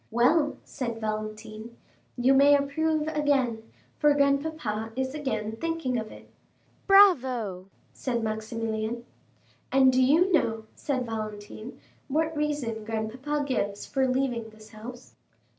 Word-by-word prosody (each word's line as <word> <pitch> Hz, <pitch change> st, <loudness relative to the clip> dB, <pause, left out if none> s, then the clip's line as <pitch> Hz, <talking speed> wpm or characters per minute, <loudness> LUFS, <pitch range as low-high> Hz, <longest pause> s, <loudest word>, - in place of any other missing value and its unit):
"Well," 290 Hz, +6 st, +3 dB
said 235 Hz, -3 st, -5 dB
Valentine, 215 Hz, +1 st, -5 dB, 0.4 s
"you 250 Hz, +2 st, +4 dB
may 280 Hz, +1 st, +7 dB
approve 310 Hz, +2 st, 0 dB
again, 275 Hz, -7 st, +1 dB, 0.4 s
for 295 Hz, -1 st, +4 dB
grandpapa 280 Hz, -6 st, 0 dB
is 260 Hz, +1 st, -2 dB
again 220 Hz, -7 st, -3 dB
thinking 330 Hz, -4 st, -2 dB
of 220 Hz, -1 st, -6 dB
it." -, -, -13 dB, 0.6 s
"Bravo," 255 Hz, -, +4 dB, 0.3 s
said 240 Hz, -3 st, -2 dB
Maximilian. 220 Hz, +1 st, -3 dB, 0.7 s
40272m -, -, -9 dB
"And 265 Hz, -1 st, +6 dB
do 255 Hz, -, +4 dB
you 320 Hz, +9 st, +4 dB
know," 225 Hz, -8 st, +2 dB
said 260 Hz, -4 st, -2 dB
Valentine, 215 Hz, +1 st, -6 dB, 0.3 s
"what 315 Hz, +3 st, 0 dB
reason 290 Hz, -7 st, -2 dB
grandpapa 235 Hz, +7 st, -2 dB
gives 205 Hz, -7 st, -2 dB
for 265 Hz, -1 st, +1 dB
leaving 255 Hz, -3 st, -1 dB
this 215 Hz, 0 st, -16 dB
house." 230 Hz, +3 st, -10 dB
250 Hz, 125 wpm, -27 LUFS, 220-290 Hz, 0.7 s, may